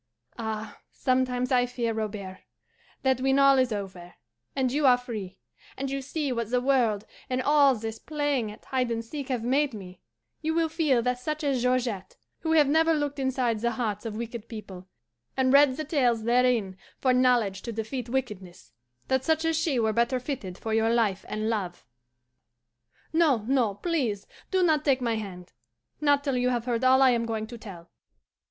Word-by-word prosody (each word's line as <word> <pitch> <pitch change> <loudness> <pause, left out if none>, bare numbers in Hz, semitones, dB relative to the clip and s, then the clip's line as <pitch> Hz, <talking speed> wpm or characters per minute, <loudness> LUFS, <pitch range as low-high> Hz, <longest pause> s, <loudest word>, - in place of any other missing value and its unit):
Ah, 220 -1 -5
sometimes 255 -1 0
I 250 -1 +3
fear, 240 -2 -2
Robert, 205 -4 -5 0.6
that 265 -1 +2
when 270 +1 +2
all 275 -1 +6
is 255 -2 +2
over, 190 -4 -6 0.4
and 260 -2 +1
you 290 +1 +2
are 250 -1 +6
free, 215 -7 -7 0.4
and 270 0 -3
you 275 0 -2
see 280 +1 -3
what 235 -3 -2
the 250 +1 +2
world 245 -6 +1 0.2
and 255 0 0
all 280 0 +4
this 225 0 -6
playing 290 -7 -1
at 210 - -14
hide 255 -2 -1
and 230 -1 -3
seek 280 +2 -6
have 245 -4 -1
made 270 +1 +1
me, 185 -3 -10 0.4
you 320 0 -1
will 330 -1 +2
feel 305 -7 +1
that 250 0 0
such 305 +4 -4
as 275 -4 +1
Georgette, 240 -6 -1 0.2
who 320 -1 -1
have 300 -3 +5
never 320 +2 +3
looked 290 -1 -2
inside 255 -4 0
the 235 +2 0
hearts 215 -5 -2
of 225 -2 -5
wicked 235 -1 -6
people, 190 -5 -9 0.5
and 260 0 +3
read 280 -2 +6
the 310 - -3
tales 250 -7 +1
therein 235 -5 +2 0.2
for 255 -1 +2
knowledge 245 -6 +2
to 235 - -5
defeat 230 +3 -4
wickedness 210 -9 -4 0.4
that 265 0 +1
such 320 +2 +1
as 325 0 +1
she 315 -4 0
were 220 -2 +1
better 235 +3 +1
fitted 245 -9 -5
for 220 - -4
your 225 0 +2
life 220 -5 +1
and 215 +1 -2
love. 195 - -3 1.3
No, 295 -10 +3
no, 245 -7 +2
please 245 - -1 0.2
do 375 -1 +2
not 310 -4 +3
take 275 -3 +3
my 230 -3 0
hand 185 -4 -8 0.5
not 285 -1 +3
till 275 -3 0
you 250 0 +2
have 240 -2 -1
heard 240 -1 -1
all 260 +1 +6
I 260 - +6
am 230 -1 0
going 220 -1 -2
to 235 +2 -9
tell." 175 -6 -11
250 Hz, 185 wpm, -27 LUFS, 220-275 Hz, 1.3 s, all